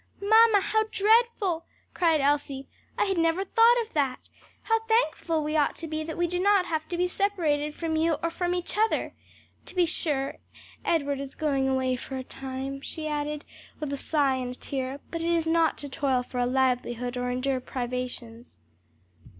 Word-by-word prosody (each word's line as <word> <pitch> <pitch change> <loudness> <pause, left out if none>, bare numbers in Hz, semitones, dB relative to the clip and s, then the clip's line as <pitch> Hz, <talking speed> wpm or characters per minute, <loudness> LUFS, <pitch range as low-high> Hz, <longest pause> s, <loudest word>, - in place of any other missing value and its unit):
"Mamma, 440 0 +6
how 435 +2 +1
dreadful!" 420 -5 +3 0.3
cried 325 -4 +3
Elsie. 280 -1 0 0.3
"I - - +3
had 385 -3 0
never 330 +4 +2
thought 465 +4 +5
of 450 - -16
that. 275 -4 -1 0.3
How 450 0 +2
thankful 330 -8 +1
we 305 +1 -2
ought 295 -2 +2
to 330 - -7
be 310 0 -3
that 320 +1 -6
we 345 - +2
do 355 +1 -2
not 400 -1 +4
have 315 -2 -3
to 350 - -2
be 355 - +2
separated 325 -6 0
from 325 -1 -2
you 325 +1 +2
or 335 - 0
from 355 +1 -1
each 355 +3 -3
other. 440 +1 +1 0.5
To - - -10
be 360 -1 +4
sure 285 -4 -2 0.5
Edward 285 -4 0
is 275 -1 -7
going 275 -3 +1
away 260 -1 +1
for 265 +2 -6
a 260 - -4
time," 270 +1 -6
she 310 +2 -6
added, 300 0 -3 0.3
with 295 -2 -3
a - - -2
sigh 280 -3 +1
and 250 -1 -3
a - - -12
tear, 270 0 -4
"but 335 - -3
it 335 - 0
is 335 -1 +2
not 325 0 +2
to 290 - -6
toil 265 -2 0
for 250 0 -5
a 245 - +2
livelihood 250 -1 0
or 250 0 -2
endure 255 +1 0
privations." 245 - -5
305 Hz, 190 wpm, -27 LUFS, 265-350 Hz, 0.5 s, Mamma